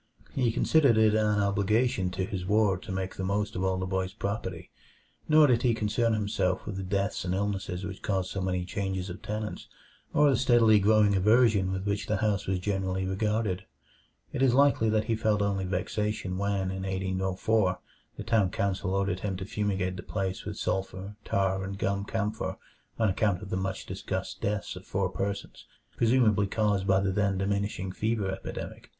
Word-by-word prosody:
He 125 Hz, -4 st, +1 dB
considered 140 Hz, -1 st, +4 dB
it 110 Hz, -1 st, +5 dB
an 105 Hz, -1 st, +2 dB
obligation 100 Hz, 0 st, +1 dB
to 95 Hz, +1 st, -2 dB
his 95 Hz, -1 st, -4 dB
ward 100 Hz, -1 st, +2 dB
to -, -, -7 dB
make 95 Hz, 0 st, -3 dB
the 95 Hz, -, -4 dB
most 100 Hz, +2 st, -1 dB
of 95 Hz, -, -2 dB
all 95 Hz, 0 st, +1 dB
the 95 Hz, -, -2 dB
boy's 95 Hz, +1 st, -2 dB
property, 100 Hz, -5 st, -4 dB, 0.6 s
nor 155 Hz, 0 st, +7 dB
did 120 Hz, -4 st, +3 dB
he 120 Hz, -3 st, +2 dB
concern 115 Hz, +1 st, +1 dB
himself 100 Hz, -3 st, -1 dB
with 100 Hz, -3 st, -5 dB
the -, -, -3 dB
deaths 100 Hz, +2 st, -1 dB
and 90 Hz, 0 st, -1 dB
illnesses 95 Hz, -2 st, -2 dB
which 95 Hz, 0 st, -7 dB
caused 95 Hz, -4 st, -1 dB
so 95 Hz, -, -3 dB
many 90 Hz, -1 st, -1 dB
changes 95 Hz, 0 st, -3 dB
of 90 Hz, -, -9 dB
tenants, 105 Hz, 0 st, -5 dB, 0.4 s
or 145 Hz, -1 st, +4 dB
the -, -, +3 dB
steadily 115 Hz, -4 st, +5 dB
growing 105 Hz, 0 st, +4 dB
aversion 105 Hz, -1 st, +4 dB
with 95 Hz, +1 st, -3 dB
which 100 Hz, +1 st, -1 dB
the 105 Hz, -1 st, +1 dB
house 100 Hz, -1 st, 0 dB
was 95 Hz, 0 st, +1 dB
generally 95 Hz, 0 st, -1 dB
regarded. 105 Hz, 0 st, -1 dB, 0.7 s
It -, -, -2 dB
is 130 Hz, -2 st, +4 dB
likely 140 Hz, -5 st, +4 dB
that 110 Hz, 0 st, +2 dB
he 115 Hz, -, 0 dB
felt 110 Hz, -2 st, +1 dB
only 100 Hz, -2 st, 0 dB
vexation 100 Hz, +1 st, -2 dB
when, 100 Hz, -2 st, 0 dB
in 95 Hz, 0 st, -4 dB
1804, 95 Hz, +1 st, 0 dB, 0.4 s
the -, -, -5 dB
town 110 Hz, -5 st, +2 dB
council 95 Hz, 0 st, -1 dB
ordered 100 Hz, -2 st, 0 dB
him 95 Hz, -1 st, -3 dB
to 95 Hz, -, -5 dB
fumigate 95 Hz, -3 st, -1 dB
the -, -, -5 dB
place 95 Hz, -2 st, -3 dB
with -, -, -5 dB
sulfur, 95 Hz, +1 st, -3 dB
tar, 95 Hz, 0 st, 0 dB
and 95 Hz, +1 st, -5 dB
gum 100 Hz, 0 st, -1 dB
camphor 110 Hz, 0 st, -2 dB, 0.4 s
on 110 Hz, -, +2 dB
account 100 Hz, -1 st, +1 dB
of 100 Hz, -, -9 dB
the -, -, 0 dB
much 95 Hz, 0 st, -3 dB
discussed -, -, -4 dB
deaths 105 Hz, 0 st, -2 dB
of 90 Hz, -, -9 dB
four 95 Hz, -1 st, -1 dB
persons, 100 Hz, +1 st, -4 dB, 0.3 s
presumably 110 Hz, -4 st, +3 dB
caused 100 Hz, -2 st, 0 dB
by 95 Hz, 0 st, +4 dB
the 95 Hz, 0 st, 0 dB
then 100 Hz, 0 st, +1 dB
diminishing 100 Hz, -1 st, -1 dB
fever 110 Hz, -1 st, -1 dB
epidemic. 95 Hz, -, -7 dB
100 Hz, 185 wpm, -28 LUFS, 95-110 Hz, 0.7 s, nor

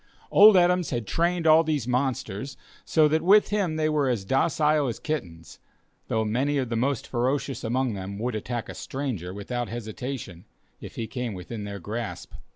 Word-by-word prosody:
Old 210 Hz, -1 st, +8 dB
Adams 180 Hz, -1 st, +3 dB
had 120 Hz, -4 st, -2 dB
trained 170 Hz, -, 0 dB
all 160 Hz, +1 st, +7 dB
these 150 Hz, -6 st, -1 dB
monsters 130 Hz, -1 st, -2 dB, 0.3 s
so 155 Hz, -2 st, +4 dB
that 155 Hz, +1 st, +1 dB
with 205 Hz, +4 st, +5 dB
him 195 Hz, -6 st, 0 dB
they 155 Hz, 0 st, +1 dB
were 150 Hz, -3 st, +1 dB
as 115 Hz, -6 st, -1 dB
docile 150 Hz, +4 st, +2 dB
as 120 Hz, -, -3 dB
kittens, 85 Hz, -, -5 dB, 0.5 s
though 110 Hz, 0 st, 0 dB
many 135 Hz, +7 st, 0 dB
of 130 Hz, -3 st, -1 dB
the 115 Hz, -, -2 dB
most 130 Hz, +2 st, 0 dB
ferocious 130 Hz, +1 st, -1 dB
among 125 Hz, +1 st, 0 dB
them 100 Hz, 0 st, -6 dB
would 120 Hz, +3 st, -2 dB
attack 115 Hz, +2 st, -4 dB
a -, -, -7 dB
stranger 125 Hz, -, -4 dB
without 115 Hz, +4 st, -4 dB
hesitation, 110 Hz, -4 st, -6 dB, 0.3 s
if -, -, -10 dB
he 115 Hz, -, -3 dB
came 125 Hz, -3 st, -4 dB
within 105 Hz, +4 st, -7 dB
their 100 Hz, 0 st, -6 dB
grasp. 110 Hz, +4 st, -6 dB
125 Hz, 175 wpm, -26 LUFS, 110-150 Hz, 0.5 s, Old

